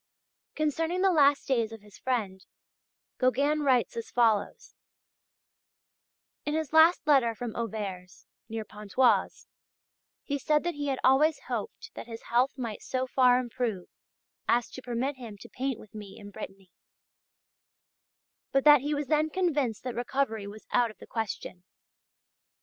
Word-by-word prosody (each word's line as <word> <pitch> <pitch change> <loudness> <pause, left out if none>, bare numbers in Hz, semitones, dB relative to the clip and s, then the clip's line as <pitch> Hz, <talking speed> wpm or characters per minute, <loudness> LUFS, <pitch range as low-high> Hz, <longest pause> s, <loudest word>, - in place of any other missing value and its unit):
Concerning 325 +4 0
the 385 - +5
last 285 -4 +4
days 230 -5 +1
of 225 -2 -9
his 210 -1 -17
friend, 205 -7 -2 0.8
Gauguin 280 +4 +2
writes 255 -5 +2
as 230 -1 -5
follows: 235 - +1 1.7
"In 295 - -2
his 315 -2 -2
last 320 +2 +6
letter 265 -6 +4
from 240 -1 -5
Auvers, 195 -6 -5 0.2
near 220 -1 -4
Pontoise, 210 +5 +1 0.8
he 285 -1 -2
said 300 +2 +2
that 345 0 -1
he 290 -1 -4
had 270 -1 0
always 300 +4 +4
hoped 485 - -5
that - - -8
his 230 -1 -8
health 250 +3 +2
might 230 -5 -5
so 255 0 -2
far 250 -1 +4
improve 235 -6 -3 0.6
as 240 0 +2
to 260 - -8
permit 255 +3 -2
him 230 -5 -9
to - - -12
paint 260 -2 -3
with 210 - -15
me 205 -2 -9
in 205 -1 -11
Brittany, 195 -2 -10 1.8
but 270 0 +2
that 295 -3 +8
he 295 +2 -1
was 290 0 -2
then 305 +3 +2
convinced 295 - 0
that 250 -1 -4
recovery 240 -4 -2
was 210 +2 -11
out 240 -1 +3
of 215 - -13
the - - -12
question. 210 -5 -5
250 Hz, 150 wpm, -28 LUFS, 220-290 Hz, 1.8 s, that